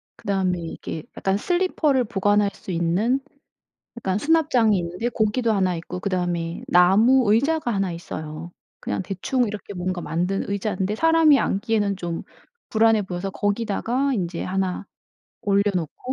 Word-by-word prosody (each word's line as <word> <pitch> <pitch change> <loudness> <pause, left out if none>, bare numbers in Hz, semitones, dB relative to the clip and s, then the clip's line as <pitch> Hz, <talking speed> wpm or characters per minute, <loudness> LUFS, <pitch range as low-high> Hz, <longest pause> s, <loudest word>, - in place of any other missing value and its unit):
그다음에 190 -3 -1
이게 165 -1 -6
약간 195 0 0
슬리퍼를 315 - +1
보관할 205 -2 +1
수 - - -8
있는 180 +10 +1 0.8
약간 190 -4 -1
수납장이 260 -7 +3
있는데 180 +7 -2
고기도 225 +1 +1
하나 190 -4 +1
있고 170 +2 -6
그다음에 175 -3 -2
나무 205 +7 +5
의자가 275 +2 +2
하나 195 -2 0
있어요. 160 -1 -7 0.3
그냥 - - -3
대충 200 +7 -1
이렇게 205 -1 -6
뭔가 180 -1 -3
만든 180 +5 -2
의자인데 200 0 -1
사람이 325 0 +5
앉기에는 205 -1 0
좀 170 -2 -4 0.5
불안해 220 -1 +3
보여서 190 0 -4
거기다가 230 +7 -1
인제 175 -6 -2
하나 190 0 -2 0.6
올려놓고 200 - 0
200 Hz, 330 characters per minute, -23 LUFS, 180-230 Hz, 0.8 s, 나무